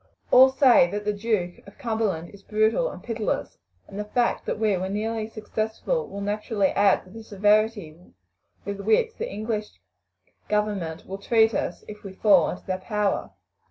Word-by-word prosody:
All 260 +1 +8
say 265 -9 +5
that 205 +2 -4
the 210 - +1
Duke 205 -4 -2
of 200 - -15
Cumberland 215 -8 -2
is 200 - -15
brutal 220 - +1
and - - -10
pitiless, 225 -3 -3 0.3
and 200 - -8
the - - -1
fact 240 +3 0
that - - -1
we 215 -2 +2
were 185 +1 -3
nearly 215 +2 -2
successful 220 - -3
will 200 - -7
naturally 205 0 0
add 200 -1 +3
to 185 - -17
the 225 +2 -10
severity 210 -4 +1 0.7
with 200 0 -4
which 225 - +2
the 475 - -3
English 215 -1 -4 0.7
government 205 -6 -1
will 195 +1 -7
treat 225 +1 +3
us 175 - -3
if 210 0 -10
we 195 -2 -8
fall 190 -4 +4
into 180 - -7
their 185 0 -2
power. 205 +1 -1
210 Hz, 170 wpm, -25 LUFS, 195-225 Hz, 0.7 s, All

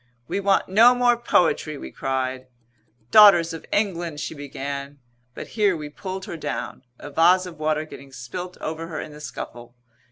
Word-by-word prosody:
"We - - -2
want 200 -1 +2
no 230 +6 +6
more 245 -1 +4
poetry!" 165 -9 +1
we - - -8
cried. 130 -1 -3 0.6
"Daughters 175 -6 +7
of 165 - -9
England!" 175 -7 -1
she - - -4
began, 140 -1 -6 0.4
but - - -8
here 205 -5 +1
we 150 -1 -7
pulled 190 +5 -6
her 170 - -6
down, 155 - -5 0.2
a 145 - -10
vase 180 +5 +4
of 170 -4 -10
water 155 0 0
getting 140 -3 -12
spilt 135 +9 -7
over 160 +1 -5
her 160 -2 -5
in - - -7
the 150 0 -12
scuffle. 120 -4 -8
160 Hz, 170 wpm, -23 LUFS, 140-185 Hz, 0.6 s, Daughters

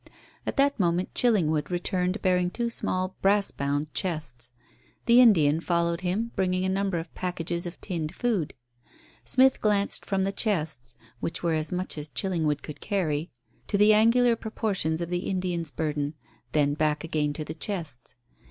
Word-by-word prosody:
At - - -2
that 280 -2 +3
moment 175 0 +1
Chillingwood 160 - +2
returned 180 +2 -1
bearing 180 -2 +2
two 235 +4 -2
small 185 -4 -1
brass 200 +1 +3
bound 145 +2 -2
chests. 135 -9 -2 0.5
The 240 +1 +7
Indian 160 -10 +5
followed 170 0 0
him 200 +6 -1
bringing 185 0 +1
a - - +1
number 195 -1 0
of 165 0 -6
packages 175 -1 -3
of 175 - -9
tinned 165 -5 -4
food. 215 -11 -1 0.7
Smith 260 +1 +4
glanced 205 -2 +1
from 195 -1 0
the 195 - 0
chests 155 - -2 0.2
which 170 - -4
were 170 -1 +2
as 155 +2 0
much 180 -3 -2
as 150 +1 -5
Chillingwood 155 0 -1
could 150 - -8
carry 165 -6 -1 0.4
to 200 - +1
the 210 +1 +6
angular 230 +2 +5
proportions 200 -8 -1
of 170 - -3
the 180 +1 -2
Indian's 180 -4 -1
burden, 150 +1 -2 0.4
then 145 -1 +2
back 150 +1 0
again 155 -2 0
to 155 +1 -5
the 155 - -5
chests. 160 - -4
175 Hz, 160 wpm, -27 LUFS, 155-200 Hz, 0.7 s, The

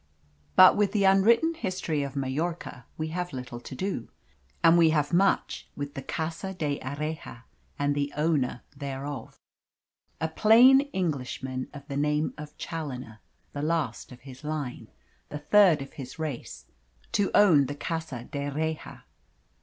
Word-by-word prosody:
But 185 - +9
with 205 -1 +1
the 205 -2 +2
unwritten 220 +12 +5
history 185 - -2
of 140 0 -4
Majorca 140 -1 -3
we 155 0 -3
have 180 0 -4
little 125 -2 -6
to 125 - -9
do, 185 - -3 0.5
and 165 - +7
we 165 -2 +6
have 150 0 +1
much 195 +3 +1
with 145 0 -5
the 135 - -5
Casa 165 +7 -4
d'Erraha 145 -3 -4 0.3
and 145 0 +1
the 145 0 -1
owner 150 -6 0
thereof 140 -2 -6 0.8
a 160 - 0
plain 235 +10 +6
Englishman 130 -6 -3
of 145 -1 -11
the 140 - -4
name 150 +1 +1
of 150 0 -10
Challoner 130 -9 -6 0.3
the 145 - -4
last 150 -8 -2
of 125 - -12
his 130 +1 -12
line, 150 -4 -4 0.4
the 150 - -5
third 165 -1 +5
of 135 - -13
his 130 -2 -9
race, 155 -6 -5 0.5
to 205 -2 +1
own 165 -10 +6
the 145 - -5
Casa 160 -5 -4
d'Erraha. 150 +3 -4
150 Hz, 145 wpm, -27 LUFS, 135-170 Hz, 0.8 s, But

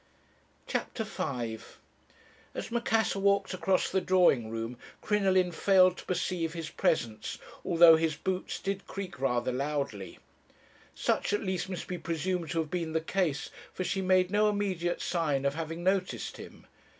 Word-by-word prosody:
"CHAPTER 225 - -2
V 120 - -3 1.0
"As - - -5
Macassar 225 -3 +1
walked 200 0 +2
across 185 0 +1
the 190 - +2
drawing 175 -13 +3
room, 115 +2 -5 0.2
Crinoline 190 -3 +2
failed 185 0 +4
to - - -10
perceive 175 -2 -1
his 165 -2 -5
presence, 110 -7 -1 0.3
although 165 -1 +7
his 160 -1 0
boots 185 +4 -3
did 195 0 -3
creak 190 -3 -6
rather 125 -2 +1
loudly. 135 -7 -3 0.8
Such - - 0
at 205 - 0
least 185 -2 -2
must 185 - -4
be 180 -1 -5
presumed 170 +1 -2
to 165 - -1
have 155 - -7
been 165 -3 -2
the 160 - +2
case, 160 -3 -1 0.2
for 185 - -3
she 195 +1 -1
made 185 -1 +3
no 210 +1 +4
immediate 190 -4 -1
sign 150 -6 0
of 140 - +2
having 165 +2 -5
noticed 190 0 -1
him. - - -12
175 Hz, 150 wpm, -30 LUFS, 150-190 Hz, 1.0 s, although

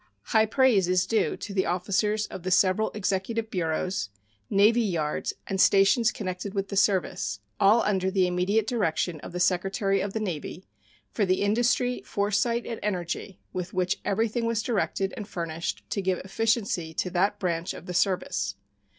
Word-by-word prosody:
High 220 - +3
praise 220 -6 +3
is 185 0 +2
due 220 +3 0
to 205 - -7
the 190 -1 +1
officers 205 +4 0
of - - -8
the 185 - -3
several 185 +3 +3
executive 215 +3 -2
bureaus, 170 - -1 0.4
navy 215 +4 +4
yards, 165 -8 -1
and 195 0 0
stations 200 +4 +5
connected 190 0 -5
with 195 0 -2
the 200 - -4
service, 185 - +1 0.2
all 210 +4 +5
under 190 -2 +1
the 190 -1 +2
immediate 180 +4 +1
direction 175 -7 -1
of - - -9
the 180 - -4
Secretary 195 +2 +1
of 200 -1 -3
the 220 - -1
Navy, 180 -2 -5 0.5
for 215 - 0
the 185 0 +1
industry, 245 +4 +1
foresight, 210 +4 0
and 230 - -5
energy 185 -1 -3
with 180 0 -5
which 185 0 0
everything 225 +3 0
was 230 -1 0
directed 195 -4 -1
and 210 - -6
furnished 170 -3 -4
to 200 - 0
give 185 -1 0
efficiency 200 -6 0
to 180 - -1
that 195 +3 +1
branch 175 -1 -2
of - - -10
the 180 - -5
service. 175 - 0
195 Hz, 170 wpm, -27 LUFS, 180-215 Hz, 0.5 s, stations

